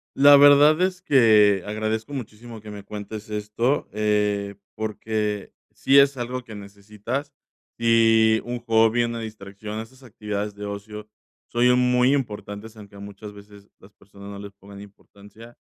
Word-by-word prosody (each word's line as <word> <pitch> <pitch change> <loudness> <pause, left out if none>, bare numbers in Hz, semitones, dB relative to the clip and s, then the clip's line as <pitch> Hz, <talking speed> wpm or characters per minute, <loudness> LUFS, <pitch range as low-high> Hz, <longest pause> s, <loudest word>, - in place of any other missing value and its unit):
La 145 +1 +7
verdad 145 +3 +6
es 185 0 -1
que, 110 - +4
agradezco 110 +4 -3
muchísimo 115 -2 -8
que 105 0 -12
me 105 -1 -9
cuentes 105 +1 -8
esto, 105 +6 -2
eh, 105 -1 -1 0.2
porque 105 -1 -4 0.2
sí 135 +1 +2
es 140 -1 +3
algo 125 +1 -5
que 110 - -12
necesitas. 105 +7 -7 0.5
Y 115 -1 +3
un 120 0 -5
hobby, 115 0 +2
una 115 0 -5
distracción, 105 -1 -8
esas 130 +4 -11
actividades 105 -3 -5
de 105 0 -8
ocio, 105 +1 -8 0.4
son 125 +1 +2
muy 125 +1 +3
importantes, 110 -4 -5
aunque 100 -2 -14
muchas 100 +1 -10
veces 100 0 -16
las 100 +2 -19
personas 100 0 -14
no 100 - -8
les 100 0 -9
pongan 100 0 -14
importancia. 105 +3 -16
110 Hz, 145 wpm, -23 LUFS, 105-120 Hz, 0.5 s, La